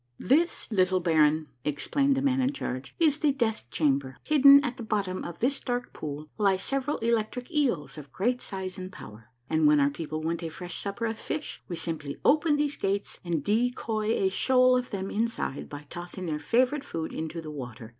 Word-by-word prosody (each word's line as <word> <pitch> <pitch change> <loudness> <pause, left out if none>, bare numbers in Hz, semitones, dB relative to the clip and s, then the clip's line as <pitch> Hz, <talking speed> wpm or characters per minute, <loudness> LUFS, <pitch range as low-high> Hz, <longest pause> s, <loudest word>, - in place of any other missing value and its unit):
" 120 - -45 0.2
This, 335 +4 +2
little 185 -2 +3
baron," 155 -2 +3 0.2
explained 275 - +1
the 270 - 0
man 270 -1 +2
in 260 +2 +1
charge, 130 - -5
" - - -41
is 310 -3 +3
the 300 -2 +3
death 230 - -1
chamber. 135 -3 0
Hidden 280 -1 +7
at 250 -1 -3
the - - -7
bottom 200 -4 -2
of 170 -1 -7
this 270 +4 +1
dark 245 0 -3
pool 150 0 -6
lie 200 -2 +4
several 275 +8 -1
electric 235 +3 -1
eels 240 - 0
of 140 -2 -12
great 245 - 0
size 190 -1 -5
and 185 0 -6
power, 110 - -12 0.2
and 155 0 +3
when 150 0 +5
our 140 0 +3
peo 160 +2 -6
ple 155 +1 -3
want 165 +1 -2
a 165 - -3
fresh 175 +2 -6
supper 200 +3 -3
of 225 -1 -3
fish 310 - -4
we 175 - -4
simply 160 -4 -4
open 300 +1 +4
these 290 -1 0
gates 200 +1 -2
and 170 -5 -1
decoy 225 -1 0
a 190 - +2
shoal 255 +5 +4
of 250 0 -1
them 195 -2 -4
inside 225 -10 -2
by 145 0 -8
tossing 175 +1 -6
their 155 -3 -2
favorite 255 - +2
food 165 - -5
into 160 +1 -4
the 155 -2 -7
water. 120 -6 -8
195 Hz, 205 wpm, -28 LUFS, 155-255 Hz, 0.2 s, Hidden